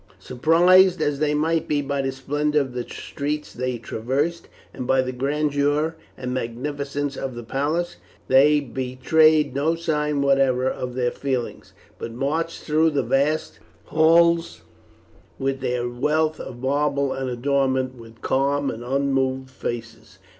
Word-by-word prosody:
Surprised 175 - +4
as 145 -2 0
they 150 -1 +1
might 160 +2 0
be 150 - +1
by 140 0 -1
the 135 0 -1
splendour 145 +3 0
of 135 -3 -3
the 125 - -2
streets 150 +4 -5
they 125 0 -2
traversed, 135 +9 -2 0.3
and 125 - -6
by 130 - +3
the 130 0 0
grandeur 145 +3 0 0.2
and 125 -1 -4
magnificence 140 +3 -3
of 135 -2 -5
the 120 - -7
palace, 150 +8 -2 0.3
they 145 +3 +5
betrayed 135 +4 +2
no 150 +5 +1
sign 150 -3 -1
whatever 135 -2 +3
of 125 -1 -3
their 125 -1 0
feelings, 130 -4 -4 0.3
but 115 - -5
marched 150 +7 -2
through 155 +1 +3
the 145 -3 0
vast 150 +4 0 0.2
halls 165 +1 +3 0.7
with 135 0 -2
their 125 0 -1
wealth 155 +6 0
of 120 - -7
marble 140 +1 0
and 130 -1 -3
adornments 130 0 0
with 115 -1 -14
calm 140 +1 +1
and 115 - -7
unmoved 130 0 0
faces. 120 -2 -7
140 Hz, 140 wpm, -23 LUFS, 130-150 Hz, 0.7 s, they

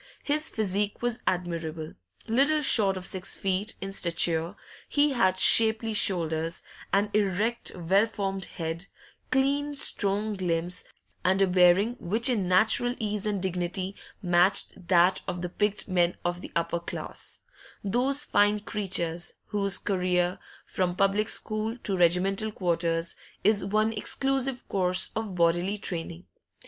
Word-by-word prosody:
His 300 +2 +1
physique 205 0 -2
was 240 -1 0
admirable; 165 -3 -3 0.3
little 280 +7 +2
short 200 -7 +3
of 185 - -7
six 190 -1 +1
feet 195 +2 -1
in 195 0 -4
stature, 170 -1 +1 0.3
he 290 0 +2
had 185 -7 +2
shapely 220 +2 +6
shoulders, 165 -5 +1 0.3
an 205 +1 +1
erect 210 +3 0
well 190 +5 +2
formed 195 -3 -4
head, 165 +2 -5 0.4
clean 280 +3 0
strong 210 -4 0
limbs, 175 -1 -1 0.4
and 185 +2 +2
a 195 - +5
bearing 185 +5 +3
which 220 +8 +1
in 210 -7 0
natural 220 +6 +3
ease 210 -2 -3
and 205 -2 -1
dignity 185 +1 -3 0.3
matched 175 0 +1
that 180 +1 +3
of 180 -1 -4
the 180 - -3
picked 205 +3 -2
men 175 -2 +1
of 175 0 -2
the - - -9
upper 170 0 -1
class 170 - -6 0.5
those 255 +8 +1
fine 205 -6 +2
creatures 180 -5 -2 0.2
whose 200 -2 0
career, 180 -2 -1 0.3
from 180 -1 -2
public 200 +2 +1
school 220 +2 -2
to 200 -5 -2
regimental 190 +5 +1
quarters, 170 -3 -1 0.3
is 205 -1 +3
one 215 +3 0
exclusive 270 +3 -1
course 185 -1 0
of 220 -4 -4
bodily 175 +4 +1
training. 165 - -5
195 Hz, 135 wpm, -27 LUFS, 175-215 Hz, 0.5 s, shapely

